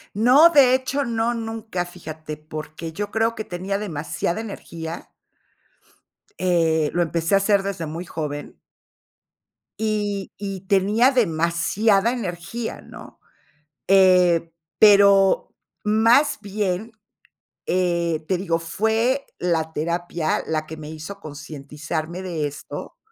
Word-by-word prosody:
No, 255 Hz, +10 st, +7 dB
de 275 Hz, -6 st, +6 dB
hecho, 270 Hz, +2 st, -1 dB
no, 230 Hz, 0 st, 0 dB
nunca, 225 Hz, -5 st, -4 dB
fíjate, 160 Hz, -3 st, -8 dB
porque 155 Hz, +1 st, -7 dB
yo 205 Hz, +3 st, -4 dB
creo 225 Hz, +1 st, +1 dB
que 215 Hz, -, -4 dB
tenía 190 Hz, +2 st, -3 dB
demasiada 170 Hz, 0 st, -3 dB
energía 170 Hz, -6 st, -7 dB, 1.3 s
Eh, 165 Hz, -4 st, +2 dB
lo 175 Hz, -, +1 dB
empecé 170 Hz, +2 st, -1 dB
a -, -, +7 dB
hacer 200 Hz, 0 st, +2 dB
desde 195 Hz, -4 st, -3 dB
muy 165 Hz, +3 st, -6 dB
joven. 150 Hz, -3 st, -6 dB, 1.2 s
Y 205 Hz, -2 st, -2 dB
y 195 Hz, -2 st, -5 dB
tenía 205 Hz, +7 st, +4 dB
demasiada 195 Hz, -, +2 dB
energía, 225 Hz, 0 st, -5 dB
¿no? -, -, -13 dB, 0.7 s
Eh, 180 Hz, -3 st, +5 dB, 0.3 s
pero 200 Hz, -2 st, +6 dB, 0.3 s
más 230 Hz, +7 st, +4 dB
bien, 205 Hz, +1 st, -2 dB, 0.7 s
eh, 170 Hz, -3 st, 0 dB
te 185 Hz, 0 st, +1 dB
digo, 170 Hz, -3 st, -1 dB
fue 220 Hz, +10 st, 0 dB
la 160 Hz, -2 st, 0 dB
terapia 170 Hz, +1 st, -1 dB
la 155 Hz, -1 st, -2 dB
que 160 Hz, -, -8 dB
me 155 Hz, 0 st, -8 dB
hizo 160 Hz, +6 st, -8 dB
concientizarme 155 Hz, +2 st, -6 dB
de 170 Hz, -5 st, -3 dB
esto, 145 Hz, 0 st, -7 dB
185 Hz, 115 wpm, -22 LUFS, 160-215 Hz, 1.3 s, No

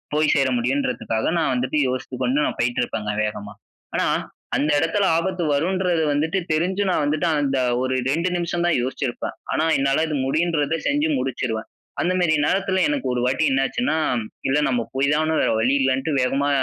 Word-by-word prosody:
போய் 155 Hz, -1 st, +3 dB
சேர 135 Hz, -2 st, +2 dB
முடியுன்றதுக்காக, 125 Hz, -3 st, -1 dB
நான் 160 Hz, -, +1 dB
வந்துட்டு 130 Hz, +4 st, -1 dB
யோசித்து 130 Hz, 0 st, -4 dB
கொண்டு 135 Hz, +4 st, +1 dB
நான் -, -, -4 dB
போயிட்டுருப்பேங்க, 115 Hz, -3 st, -1 dB
வேகமா. 105 Hz, 0 st, -6 dB, 0.4 s
ஆனா -, -, +1 dB, 0.5 s
அந்த 150 Hz, +2 st, +1 dB
இடத்தில 195 Hz, +6 st, +1 dB
ஆபத்து 180 Hz, +2 st, -1 dB
வரும்ன்றது 175 Hz, +2 st, +1 dB
வந்துட்டு, 155 Hz, +5 st, 0 dB
தெரிஞ்சு 185 Hz, +6 st, +1 dB
நான் 180 Hz, -, +1 dB
வந்துட்டு, 150 Hz, +3 st, 0 dB
அந்த 135 Hz, -2 st, 0 dB, 0.2 s
ஒரு 130 Hz, 0 st, -1 dB, 0.2 s
2 170 Hz, +5 st, +1 dB
நிமிஷம் 175 Hz, 0 st, -1 dB
தான் 175 Hz, -, +2 dB
யோசிச்சிருப்பேன். 130 Hz, 0 st, -3 dB, 0.2 s
ஆனா 155 Hz, -, +1 dB
என்னால 135 Hz, +3 st, +2 dB
இது 155 Hz, -, -2 dB
முடியுன்றத 155 Hz, +1 st, +1 dB
செஞ்சு 290 Hz, +2 st, +1 dB
முடிச்சுருவேன். 115 Hz, -, -3 dB, 0.3 s
அந்த 180 Hz, +1 st, +1 dB
மாரி 160 Hz, -3 st, +3 dB
நேரத்துல, 190 Hz, +1 st, +1 dB
எனக்கு 285 Hz, -2 st, -1 dB
ஒரு 125 Hz, -, -1 dB
வாட்டி 135 Hz, +5 st, +1 dB
என்னாச்சுன்னா, 145 Hz, -, 0 dB, 0.5 s
இல்ல 140 Hz, +3 st, +2 dB
நம்ம 120 Hz, -2 st, 0 dB
போய்தான, 150 Hz, +3 st, +2 dB
வேற -, -, +2 dB
வழி 125 Hz, +4 st, +2 dB
இல்லன்ட்டு, 135 Hz, +3 st, +1 dB
வேகமா 135 Hz, +3 st, +1 dB
145 Hz, 160 wpm, -22 LUFS, 130-170 Hz, 0.5 s, போய்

